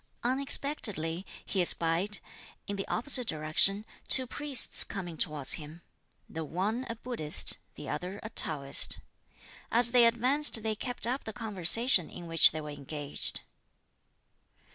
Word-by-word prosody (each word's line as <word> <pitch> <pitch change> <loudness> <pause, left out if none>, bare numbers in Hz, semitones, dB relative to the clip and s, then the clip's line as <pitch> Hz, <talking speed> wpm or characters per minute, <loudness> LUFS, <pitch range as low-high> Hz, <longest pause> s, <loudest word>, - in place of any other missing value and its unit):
Unexpectedly 240 - 0 0.2
he 190 - -2
espied, 175 +4 0 0.5
in 205 - -6
the 195 - -6
opposite 250 0 0
direction, 160 +7 +2 0.2
two 260 - +5
priests 285 +1 +2
coming 175 -4 -8
towards 150 -3 +1
him: 155 +3 -13 0.4
the 160 - -7
one 205 - -4
a 230 - -5
Buddhist, 225 -10 +1 0.2
the - - -11
other 185 +3 -6
a 220 - -9
Taoist. 140 -6 +2 0.7
As 235 +1 +5
they 240 -1 +4
advanced 245 +1 +3
they 220 -1 -2
kept 245 +3 -2
up 255 +4 -4
the 220 - -8
conversation 215 -2 +2
in 175 - -11
which 165 -1 +5
they 155 - -7
were 150 0 -9
engaged. 145 0 -4
200 Hz, 135 wpm, -28 LUFS, 160-240 Hz, 0.7 s, two